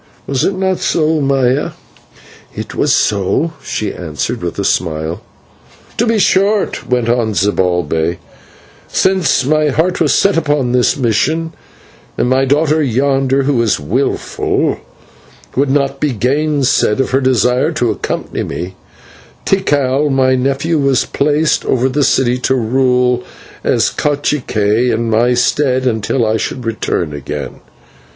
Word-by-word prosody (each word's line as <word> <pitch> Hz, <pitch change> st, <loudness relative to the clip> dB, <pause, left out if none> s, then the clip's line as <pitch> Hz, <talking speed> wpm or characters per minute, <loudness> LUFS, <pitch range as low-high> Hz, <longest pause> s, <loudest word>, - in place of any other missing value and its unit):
Was 135 Hz, 0 st, -1 dB
it 190 Hz, -, 0 dB
not 190 Hz, -1 st, -1 dB
so, 155 Hz, 0 st, +1 dB
Maya?" 135 Hz, 0 st, +1 dB, 0.8 s
"It -, -, -6 dB
was -, -, +1 dB
so," 105 Hz, -, +1 dB
she 105 Hz, -2 st, -3 dB
answered 90 Hz, +8 st, -4 dB
with 85 Hz, -1 st, -4 dB
a 100 Hz, -, -1 dB
smile. 80 Hz, 0 st, -1 dB, 0.8 s
"To 235 Hz, -, +1 dB
be 225 Hz, 0 st, +2 dB
short," 200 Hz, +1 st, +1 dB
went 125 Hz, -2 st, +1 dB
on 115 Hz, -3 st, 0 dB
Zibalbay, 90 Hz, -3 st, 0 dB, 0.7 s
"since 185 Hz, -8 st, +1 dB
my 155 Hz, +2 st, +2 dB
heart 160 Hz, +6 st, 0 dB
was 150 Hz, -, +3 dB
set 200 Hz, -3 st, +3 dB
upon 145 Hz, -5 st, 0 dB
this 125 Hz, -1 st, +2 dB
mission, 155 Hz, +7 st, 0 dB, 0.6 s
and -, -, +1 dB
my 130 Hz, +1 st, +2 dB
daughter 150 Hz, +3 st, +2 dB
yonder, 135 Hz, +1 st, +1 dB
who 135 Hz, -3 st, +1 dB
is 110 Hz, -8 st, +1 dB
wilful, 110 Hz, -, -1 dB, 0.8 s
would 140 Hz, +1 st, +1 dB
not 140 Hz, 0 st, 0 dB
be 145 Hz, -2 st, 0 dB
gainsayed 135 Hz, 0 st, +1 dB
of 135 Hz, -, 0 dB
her 135 Hz, +1 st, +2 dB
desire 125 Hz, -, +2 dB
to 125 Hz, -7 st, 0 dB
accompany -, -, -4 dB
me, 90 Hz, +2 st, -5 dB, 0.7 s
Tikal, 145 Hz, -6 st, +1 dB
my 130 Hz, -1 st, +2 dB
nephew, 140 Hz, +5 st, 0 dB
was 140 Hz, -2 st, +2 dB
placed 150 Hz, +2 st, +1 dB
over 130 Hz, 0 st, +1 dB
the 140 Hz, +2 st, 0 dB
city 125 Hz, -2 st, +2 dB
to 130 Hz, +1 st, +1 dB
rule 125 Hz, 0 st, +1 dB, 0.4 s
as -, -, +1 dB
/cacique/ 125 Hz, -6 st, 0 dB
in 115 Hz, 0 st, -1 dB
my 120 Hz, +3 st, +2 dB
stead 130 Hz, +1 st, +1 dB
until 115 Hz, 0 st, 0 dB
I 110 Hz, +1 st, +1 dB
should 125 Hz, +2 st, -4 dB
return 95 Hz, -8 st, -2 dB
again. 70 Hz, -2 st, -6 dB
130 Hz, 135 wpm, -15 LUFS, 115-145 Hz, 0.8 s, was